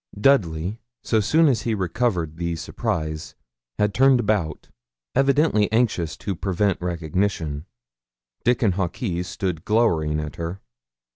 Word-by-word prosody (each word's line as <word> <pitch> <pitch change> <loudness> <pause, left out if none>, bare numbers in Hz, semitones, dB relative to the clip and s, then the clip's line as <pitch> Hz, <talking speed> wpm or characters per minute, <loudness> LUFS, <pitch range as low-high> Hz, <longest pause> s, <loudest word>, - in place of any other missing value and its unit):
Dudley, 100 - +2 0.2
so 110 - +2
soon 155 +10 +4
as 125 -6 +2
he 115 -2 -1
recovered 95 -4 -1
the 85 0 -2
surprise, 80 -1 -3 0.4
had 105 -1 +1
turned 135 -1 +5
about, 105 -8 -1 0.4
evidently 135 -5 +3
anxious 110 -9 +1
to 100 -2 -3
prevent 95 +1 0
recognition; 85 -3 -2 0.8
Dickon 120 -4 +3
Hawkes 90 0 -2
stood 90 -3 -3
glowering 85 -9 +2
at 75 -1 -5
her. 85 +3 -4
95 Hz, 120 wpm, -23 LUFS, 85-115 Hz, 0.8 s, turned